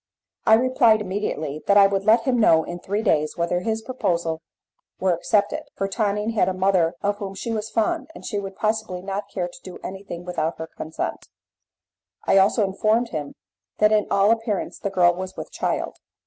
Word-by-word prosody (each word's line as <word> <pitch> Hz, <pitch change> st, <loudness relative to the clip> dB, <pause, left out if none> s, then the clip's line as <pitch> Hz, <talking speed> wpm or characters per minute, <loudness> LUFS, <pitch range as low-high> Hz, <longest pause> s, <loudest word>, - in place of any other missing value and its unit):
I 220 Hz, -, +8 dB
replied 240 Hz, -2 st, +4 dB
immediately 185 Hz, -7 st, -3 dB
that 200 Hz, -, +5 dB
I 200 Hz, -, +8 dB
would 195 Hz, 0 st, 0 dB
let 225 Hz, +2 st, +5 dB
him 250 Hz, -1 st, +1 dB
know 160 Hz, -8 st, +5 dB
in 175 Hz, +1 st, -6 dB
three 205 Hz, +4 st, -2 dB
days 155 Hz, -7 st, +1 dB
whether 170 Hz, +1 st, 0 dB
his 220 Hz, +3 st, -2 dB
proposal 170 Hz, -10 st, -1 dB, 0.6 s
were 185 Hz, -1 st, +2 dB
accepted, 205 Hz, +4 st, +1 dB
for 195 Hz, -, -1 dB
Tonine 210 Hz, +1 st, -1 dB
had 215 Hz, -4 st, +2 dB
a 185 Hz, -, -3 dB
mother 185 Hz, -3 st, +2 dB
of 205 Hz, 0 st, 0 dB
whom 195 Hz, -2 st, -6 dB
she 230 Hz, +4 st, -4 dB
was 220 Hz, 0 st, -3 dB
fond, 305 Hz, +11 st, 0 dB
and -, -, -10 dB
she 205 Hz, -, -2 dB
would 195 Hz, -1 st, -6 dB
possibly 215 Hz, -4 st, -2 dB
not 200 Hz, +1 st, -4 dB
care 180 Hz, -3 st, -2 dB
to 180 Hz, -, -13 dB
do 185 Hz, -, -9 dB
anything 190 Hz, -2 st, -7 dB
without 165 Hz, -2 st, -2 dB
her 160 Hz, -, -5 dB
consent. 160 Hz, +1 st, -5 dB, 1.0 s
I 195 Hz, -, +5 dB
also 200 Hz, +3 st, +3 dB
informed 215 Hz, +5 st, +1 dB
him 150 Hz, -3 st, -5 dB, 0.4 s
that 210 Hz, 0 st, +4 dB
in 215 Hz, -1 st, +3 dB
all 200 Hz, +2 st, +4 dB
appearance 225 Hz, -3 st, -1 dB
the 200 Hz, -, -2 dB
girl 180 Hz, -2 st, +4 dB
was 185 Hz, +1 st, -7 dB
with -, -, -7 dB
child. -, -, -2 dB
195 Hz, 190 wpm, -23 LUFS, 180-215 Hz, 1.0 s, I